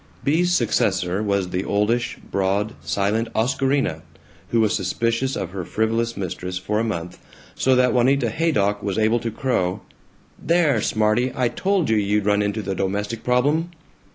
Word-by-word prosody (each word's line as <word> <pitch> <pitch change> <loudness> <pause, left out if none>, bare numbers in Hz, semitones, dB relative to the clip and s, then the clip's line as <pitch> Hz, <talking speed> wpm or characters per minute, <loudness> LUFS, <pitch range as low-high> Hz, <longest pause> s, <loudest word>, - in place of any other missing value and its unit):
Bea's 170 +5 +2
successor 95 - +1
was 100 -3 0
the 90 +1 -2
oldish, 105 +5 0
broad, 100 +3 0
silent 105 +3 0
Oscarina, 130 - 0 0.5
who 115 - +1
was 110 -1 +2
suspicious 115 +7 -1
of 90 - -4
her 95 -1 -4
frivolous 115 +4 -1
mistress 90 -1 -4
for 105 +4 -1
a - - +1
month, 90 -6 -4 0.3
so 130 0 +2
that 125 -1 +3
Juanita 125 -1 +2
Haydock 105 -9 +1
was 100 -1 -2
able 110 +2 +2
to 115 - -3
crow, 105 -6 -1 0.6
"There, 170 -3 +2
smarty, 110 +4 +1
I 125 -2 +1
told 190 - 0
you 110 - +3
you'd 105 0 +1
run 105 0 +3
into 105 +1 -1
the 100 - -2
Domestic 100 +4 -2
Problem!" 145 +7 +1
110 Hz, 155 wpm, -22 LUFS, 100-125 Hz, 0.6 s, that